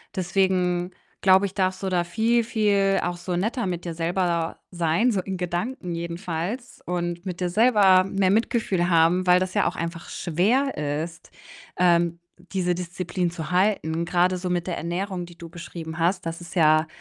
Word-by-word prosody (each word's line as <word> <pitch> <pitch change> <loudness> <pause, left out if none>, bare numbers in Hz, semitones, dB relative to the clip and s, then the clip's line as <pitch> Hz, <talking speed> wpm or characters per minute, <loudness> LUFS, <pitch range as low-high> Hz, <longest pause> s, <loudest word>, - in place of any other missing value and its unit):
Deswegen 185 -1 +1 0.3
glaube 190 +1 +5
ich, 195 - -11
darfst 185 -1 0
du 190 - 0
da 175 -1 +1
viel, 225 +6 +1
viel 200 -3 +2
auch 175 0 -2
so 175 0 -4
netter 225 +6 -1
mit 175 -1 -3
dir 170 - -3
selber 170 0 -1
sein, 175 +8 +1
so 195 -4 0
in 190 -1 -5
Gedanken 180 +2 -3
jedenfalls, 170 +7 -5
und 175 0 -3
mit 180 -2 -5
dir 180 - 0
selber 200 -3 +5
mehr 195 -1 +1
Mitgefühl 205 -5 +1
haben, 170 +3 +4
weil 180 0 +6
das 185 0 -2
ja - - +3
auch - - -2
einfach 170 0 -5
schwer 210 - 0 0.3
ist, 165 -1 -14 0.5
ähm, 170 -1 +3 0.3
diese 180 -2 +1
Disziplin 180 0 -3
zu 165 -1 -6
halten, 180 -4 +1
grade 180 +1 +2
so 180 0 -4
mit 175 -1 -1
der 175 - -2
Ernährung, 180 +1 -3
die 175 -1 -15
du 170 - -9
beschrieben 165 -1 -8
hast. 180 +2 +1
Das 165 +1 -4
ist 170 - -10
ja 155 -1 +4
180 Hz, 175 wpm, -24 LUFS, 170-195 Hz, 0.5 s, weil